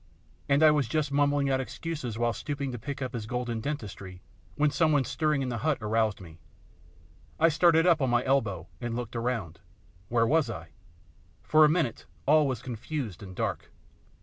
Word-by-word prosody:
And 140 +2 +4
I 155 - +8
was 145 -5 +1
just 150 +2 -1
mumbling 145 0 +2
out 130 - +2
excuses 135 -4 -5
while 120 0 +1
stooping 140 0 -4
to 120 - -6
pick 140 +4 -5
up 130 - -5
his 110 -3 -5
golden 120 -2 -3
dentistry, 100 -9 -6 0.4
when 150 0 +2
some 160 +1 +2
one 145 -3 +3
stirring 150 -1 0
in 130 - -2
the 120 -2 -3
hut 155 +2 +1
aroused 110 0 0
me. 85 -3 -13 1.0
I 165 +1 +5
started 165 +1 +4
up 170 -4 +4
on 130 - +2
my 120 0 +2
elbow 110 -11 0
and 120 -1 -3
looked 120 -1 -5
around. 115 -9 -3 0.5
Where 115 -1 +3
was 150 0 +2
I? 85 -7 -7 0.7
For 155 0 +6
a - - +4
minute 155 -7 -1 0.2
all 150 +1 +5
was 130 -3 -3
confused 120 - -5
and 95 -2 -9
dark. 95 -9 -3
125 Hz, 185 wpm, -28 LUFS, 110-150 Hz, 1.0 s, I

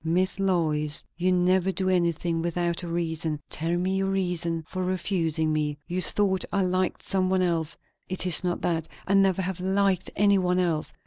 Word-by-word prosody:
Miss 185 +4 +1
Lois, 155 -6 0
you 180 +2 +1
never 185 +1 +2
do 190 0 -2
anything 170 -2 0
without 170 0 -1
a 175 - -6
reason; 160 -2 -2
tell 165 +2 -1
me 185 +2 0
your 195 0 0
reason 175 -4 -1
for 185 -1 -4
refusing 170 -4 0
me. 150 -1 -1
You 180 +1 -2
thought 190 -1 +2
I 200 -1 +1
liked 185 0 -1
some 185 -1 0
one 185 -1 +2
else; 165 -3 -1 0.3
it 185 0 -1
is 180 0 +5
not 175 -1 -1
that; 165 -2 -1 0.2
I 195 - 0
never 195 -1 +3
have 185 -1 -3
liked 190 0 +1
any 200 -1 +4
one 180 0 +1
else. 170 -4 0
180 Hz, 185 wpm, -26 LUFS, 165-190 Hz, 0.3 s, is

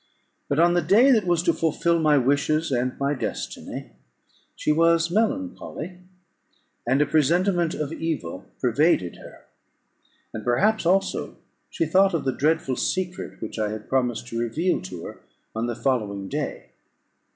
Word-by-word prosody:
But 140 - 0
on 170 +2 +5
the 175 - +3
day 210 - +5
that 220 -7 +3
was 175 -1 +2
to 170 - +3
fulfil 165 +1 +1
my 155 -2 +4
wishes 145 +4 +1
and 125 0 -1
my 140 +1 +1
destiny, 135 - -5 0.6
she - - 0
was 165 +1 +3
melancholy, 220 - -2 0.9
and 130 +3 +3
a 150 - +4
presentiment 170 +4 +2
of 150 +1 -3
evil 120 - -4
pervaded 125 - +2
her; - - -14 0.9
and 110 - -5
perhaps 195 - +2
also 195 +2 0 0.3
she 165 - -1
thought 190 +3 +3
of 160 - -2
the 130 - +1
dreadful 150 -3 0
secret 185 -1 -3
which 110 - -6
I 105 -1 0
had 110 0 -7
promised 125 -3 0
to 115 - -3
reveal 150 +11 0
to 90 -2 -8
her - - -9 0.4
on 115 +1 -1
the 120 - -3
following 105 -7 -1
day. - - -4
155 Hz, 150 wpm, -24 LUFS, 125-175 Hz, 0.9 s, on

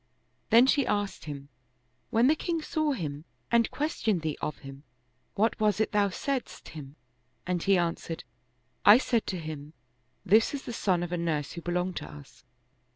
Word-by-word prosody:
Then 235 +2 +7
she 270 -1 +3
asked 205 -4 -1
him, 140 -2 -7 0.3
" 125 +1 -44
When 235 0 +3
the 290 - +6
king 335 +1 -2
saw 310 -2 0
him 150 - -4 0.3
and 235 -1 +4
questioned 225 - -1
thee 155 -2 -1
of 150 - -3
him, 135 0 -9 0.5
what 220 +4 +1
was 215 -1 +2
it 220 - +1
thou 205 -2 +3
saidst 270 +7 -4
him? 145 -3 -10 0.3
" 125 +1 -44
and 180 -1 -1
he 195 +1 +4
answered, 170 -1 -2 0.3
" 125 +1 -44
I 205 +2 +9
said 235 -3 0
to 185 - -2
him: 155 -2 -7 0.3
" 120 - -43 0.2
This 220 +8 +4
is 275 - -6
the 240 - -6
son 185 -6 +1
of 175 - -5
a 175 - -1
nurse 155 -4 -1
who 170 - -7
belonged 180 +1 -2
to - - -6
us. 145 -2 -14
180 Hz, 195 wpm, -28 LUFS, 150-225 Hz, 0.5 s, I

